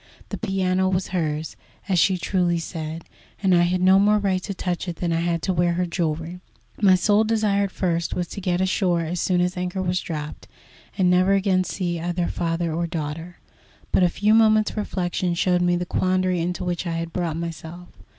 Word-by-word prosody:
The - - -4
piano 190 -3 0
was 185 0 -1
hers, 155 -3 -2 0.3
as 185 -3 +2
she 185 +2 +3
truly 175 -1 0
said, 160 -1 -5 0.4
and 190 -1 +4
I 175 - +5
had 180 +1 +1
no 190 +1 +6
more 210 +1 +4
right 195 -3 0
to 200 - -5
touch 180 0 -3
it 175 - -3
than 170 0 -2
I 165 - +1
had 170 -1 -1
to 190 - 0
wear 175 0 +2
her 180 +1 0
jewellery. 170 0 -3 0.4
My 190 -3 +6
sole 205 +4 +3
desire 215 -2 +1
at 195 - -6
first 170 -3 -1
was 175 -1 -2
to 200 - -7
get 180 -1 0
ashore 185 -2 +1
as 170 +2 -3
soon 180 -1 +1
as 180 +1 0
anchor 180 +1 -3
was 180 0 0
dropped, 150 -2 -6 0.5
and 180 -2 +3
never 185 +2 +4
again 190 -1 +2
see 175 -3 -3
either 175 +1 -1
father 165 -1 -2
or 170 +1 -1
daughter. 165 +2 -5 0.5
But - - +3
a 180 - +5
few 210 +5 +2
moments' 215 -1 +4
reflection 180 -4 -2
showed 180 +1 +2
me 175 0 +2
the 175 0 -2
quandary 185 0 0
into 175 +2 -2
which 175 0 -2
I 170 - -2
had 165 0 -4
brought 170 -3 -2
myself. 170 +1 -7
180 Hz, 205 wpm, -23 LUFS, 170-190 Hz, 0.5 s, no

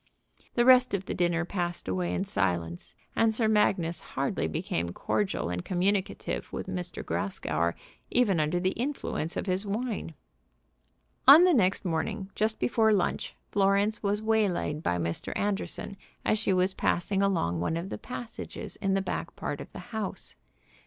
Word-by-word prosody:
The 240 - +3
rest 255 -3 +6
of 190 -1 -4
the - - -3
dinner 175 -1 +1
passed 175 -2 -3
away 90 -2 -1
in 90 - 0
silence, 85 -3 -2 0.2
and 225 -1 +3
Sir 220 -1 +3
Magnus 185 -6 +2
hardly 135 -11 -2
became 85 +2 -2
cordial 190 - -1
and 90 0 -3
communicative 190 +2 -1
with - - -5
M. - - -3 0.3
Grascour, 85 - -1 0.3
even 210 -8 +3
under 155 +3 +1
the 185 +1 +1
influence 235 - -3
of - - -2
his 185 0 0
wine. 210 -5 -3 1.1
On 295 +6 +11
the 365 -1 +5
next 195 -7 +2
morning 190 +4 -2
just 215 +1 0
before 220 -2 +3
lunch 195 -4 0 0.2
Florence 200 +2 +2
was 205 +1 0
waylaid 205 -9 +1
by 90 - 0
Mr. 85 -1 -2
Anderson 200 0 -1 0.3
as 215 - +2
she 200 - +1
was 185 +1 +2
passing 195 +3 0
along 165 - +1
one 155 - 0
of 175 +3 -4
the - - -5
passages 240 -2 -7
in 195 -1 0
the 195 - +1
back - - -4
part - - -4
of - - -10
the - - -10 0.2
house. 200 - -3
190 Hz, 160 wpm, -28 LUFS, 160-215 Hz, 1.1 s, On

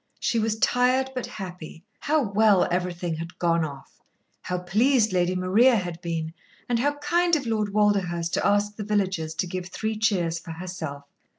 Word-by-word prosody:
She 230 - 0
was 220 0 0
tired, 255 +3 +2
but 255 -2 -4
happy. 180 -4 -8 0.2
How 305 0 +1
well 205 -2 +3
everything 175 -2 -2
had 165 +2 -7
"gone 170 -1 +2
off"! 140 -3 -8 0.4
How 180 - -3
pleased 215 +5 +2
Lady 180 0 +1
Maria 205 +8 +4
had 175 -4 -3
been, 165 -2 -3 0.3
and 240 -1 +1
how 290 +4 +1
kind 345 +3 +2
of 285 -4 -2
Lord 215 -3 -1
Walderhurst 190 -5 +1
to - - 0
ask 205 +1 +2
the 210 - -4
villagers 190 -6 -1
to 160 - -1
give 180 0 -5
three 220 +4 -3
cheers 180 -6 0
for 165 0 -8
herself! 160 -5 -6
190 Hz, 175 wpm, -25 LUFS, 170-220 Hz, 0.4 s, Maria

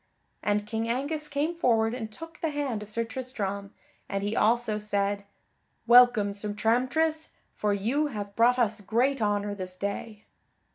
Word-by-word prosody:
And 205 0 0
King 225 +2 -2
Angus 290 +5 -1
came 295 +3 -1
forward 230 -9 +2
and 225 -3 -5
took 330 +9 -11
the 325 - 0
hand 285 -7 -2
of 210 - -9
Sir 230 +2 0
Tristram, 210 -5 -4 0.4
and 195 -1 -2
he 205 +2 -1
also 220 -1 +2
said: 200 -1 -1 0.6
"Welcome, 240 -4 +6
Sir 205 +1 -4
Tramtris, 260 +9 +1 0.2
for 210 - 0
you 235 +10 +1
have 205 -6 -6
brought 240 +2 +4
us 220 -3 +1
great 240 +6 +1
honor 205 -1 0
this 185 -2 -5
day!" 205 +2 -5
225 Hz, 155 wpm, -28 LUFS, 205-255 Hz, 0.6 s, Welcome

